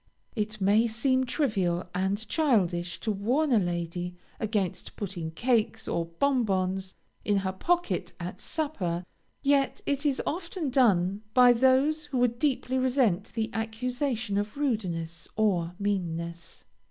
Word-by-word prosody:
It 215 Hz, -1 st, -2 dB
may 205 Hz, +4 st, +4 dB
seem 260 Hz, +3 st, +1 dB
trivial 195 Hz, -, 0 dB
and 195 Hz, +4 st, -1 dB
childish 180 Hz, -, +1 dB
to 220 Hz, -, 0 dB
warn 250 Hz, +10 st, +1 dB
a 230 Hz, -, +5 dB
lady 175 Hz, 0 st, -3 dB, 0.2 s
against 210 Hz, -5 st, -2 dB
putting 180 Hz, -5 st, -4 dB
cakes 225 Hz, +4 st, 0 dB
or 170 Hz, -, 0 dB
bon 255 Hz, +9 st, +1 dB
bons 190 Hz, -2 st, -1 dB, 0.3 s
in 205 Hz, -1 st, +2 dB
her 190 Hz, -, +1 dB
pocket 350 Hz, -, 0 dB
at -, -, -6 dB
supper, 185 Hz, -, -2 dB, 0.4 s
yet 275 Hz, -1 st, +2 dB
it 280 Hz, 0 st, 0 dB
is 285 Hz, -3 st, +1 dB
often 335 Hz, -3 st, -3 dB
done 200 Hz, -6 st, +3 dB
by 250 Hz, -1 st, +8 dB
those 265 Hz, +5 st, +3 dB
who 290 Hz, -3 st, -3 dB
would 240 Hz, -1 st, +2 dB
deeply 260 Hz, -2 st, +1 dB
resent 250 Hz, -8 st, +2 dB
the 225 Hz, -1 st, -1 dB
accusation 235 Hz, -1 st, -1 dB
of 210 Hz, +5 st, -4 dB
rudeness 175 Hz, -, -2 dB
or 180 Hz, -5 st, +1 dB
meanness. 170 Hz, -4 st, -3 dB
220 Hz, 135 wpm, -28 LUFS, 185-260 Hz, 0.4 s, by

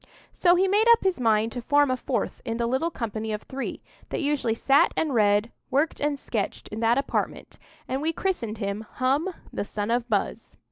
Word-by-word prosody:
So 350 Hz, -1 st, +4 dB
he 375 Hz, +2 st, +3 dB
made 415 Hz, +4 st, +3 dB
up 465 Hz, -, 0 dB
his 380 Hz, -6 st, +1 dB
mind 225 Hz, -1 st, +2 dB
to 245 Hz, -, -5 dB
form 285 Hz, +2 st, +3 dB
a -, -, +2 dB
fourth -, -, -3 dB
in 230 Hz, -2 st, -3 dB
the 235 Hz, -, 0 dB
little 265 Hz, +8 st, 0 dB
company 220 Hz, -6 st, -4 dB
of 210 Hz, -, -4 dB
three 270 Hz, +1 st, -5 dB, 0.3 s
that -, -, -2 dB
usually 280 Hz, -6 st, +1 dB
sat 275 Hz, +4 st, +3 dB
and 310 Hz, -4 st, +1 dB
read, 210 Hz, 0 st, +3 dB, 0.2 s
worked 290 Hz, +4 st, +1 dB
and 290 Hz, 0 st, 0 dB
sketched, 220 Hz, -6 st, -3 dB
in 215 Hz, -, -5 dB
that 230 Hz, +2 st, +3 dB
apartment, 275 Hz, -, -2 dB, 0.3 s
and 260 Hz, +2 st, -2 dB
we 320 Hz, +2 st, +1 dB
christened 315 Hz, -, -2 dB
him 200 Hz, 0 st, -3 dB
"Hum, 275 Hz, +8 st, +1 dB, 0.2 s
the -, -, -2 dB
son 205 Hz, +1 st, -3 dB
of 240 Hz, 0 st, 0 dB
Buz." 215 Hz, +1 st, -2 dB
250 Hz, 200 wpm, -26 LUFS, 220-290 Hz, 0.3 s, So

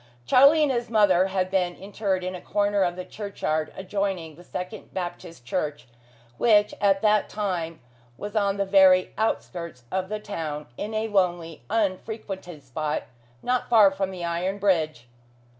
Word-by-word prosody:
Charlie 280 Hz, -, +6 dB
and 290 Hz, -, +2 dB
his 240 Hz, -1 st, -2 dB
mother 195 Hz, -5 st, +4 dB
had 185 Hz, -1 st, -1 dB
been 180 Hz, -2 st, +1 dB
interred 195 Hz, -1 st, -2 dB
in 185 Hz, 0 st, -3 dB
a 180 Hz, -, -7 dB
corner 205 Hz, -1 st, +1 dB
of 175 Hz, -2 st, +1 dB
the 185 Hz, 0 st, -6 dB
churchyard 160 Hz, -7 st, -3 dB
adjoining 190 Hz, -4 st, -3 dB
the 175 Hz, -, -14 dB
second 180 Hz, +4 st, -7 dB
Baptist 175 Hz, -6 st, -6 dB
Church, 145 Hz, +3 st, -3 dB, 0.5 s
which 210 Hz, -3 st, +4 dB
at 195 Hz, -1 st, +3 dB
that 210 Hz, -1 st, +3 dB
time 175 Hz, -6 st, -3 dB, 0.4 s
was 205 Hz, +2 st, -7 dB
on 200 Hz, -2 st, +1 dB
the 200 Hz, -, +1 dB
very 190 Hz, -1 st, +5 dB
outskirts 170 Hz, -, -3 dB
of 185 Hz, 0 st, -2 dB
the 215 Hz, 0 st, -3 dB
town, 155 Hz, -8 st, -5 dB
in 215 Hz, -, -5 dB
a 220 Hz, +1 st, 0 dB
lonely, 175 Hz, -5 st, 0 dB
unfrequented 190 Hz, -5 st, -3 dB
spot, 150 Hz, +4 st, -3 dB, 0.4 s
not 250 Hz, 0 st, 0 dB
far 215 Hz, -5 st, +7 dB
from 195 Hz, 0 st, -2 dB
the 180 Hz, -2 st, -5 dB
iron 175 Hz, +3 st, -1 dB
bridge. 160 Hz, -11 st, 0 dB
190 Hz, 160 wpm, -25 LUFS, 175-205 Hz, 0.5 s, far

